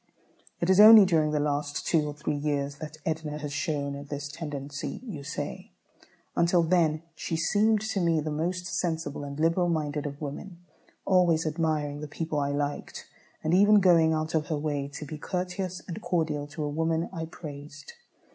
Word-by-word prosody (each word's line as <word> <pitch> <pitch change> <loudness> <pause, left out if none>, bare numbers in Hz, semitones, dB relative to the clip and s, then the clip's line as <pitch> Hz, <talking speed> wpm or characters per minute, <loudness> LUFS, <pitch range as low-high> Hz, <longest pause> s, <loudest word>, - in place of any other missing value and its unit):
"It 170 - 0
is 190 - +4
only 215 -1 +10
during 160 -4 +2
the 150 0 0
last 145 0 -1
two 155 -3 +2
or 145 - -4
three 150 0 -2
years 145 -1 -2
that 155 0 -7
Edna 155 -2 -2
has 150 -1 -5
shown 140 -1 -2
this 145 0 -5
tendency," 145 -3 -5
you 185 - -7
say. - - -6 0.6
"Until 170 0 +3
then 165 -2 +2
she 165 - -4
seemed 210 +5 +2
to 220 -2 -2
me 170 -3 +2
the 155 0 -3
most 175 +4 -2
sensible 165 -5 -2
and 140 +1 -7
liberal 170 +2 +2
minded 150 -3 -1
of 140 0 -7
women, 155 +5 -6 0.5
always 175 -4 +3
admiring 155 -2 -1
the 150 - -5
people 155 0 -3
I 140 0 0
liked, 145 0 -3 0.4
and 155 - +1
even 205 +3 +6
going 170 -4 +5
out 155 0 -1
of 155 -2 0
her 155 - -1
way 145 -2 -2
to 140 +2 -8
be 150 +1 -7
courteous 180 +1 -3
and 185 +5 -6
cordial 160 -5 -1
to 150 +1 -5
a - - -1
woman 160 +2 0
I 165 -2 -4
praised. 145 -3 -10
155 Hz, 180 wpm, -28 LUFS, 145-170 Hz, 0.6 s, only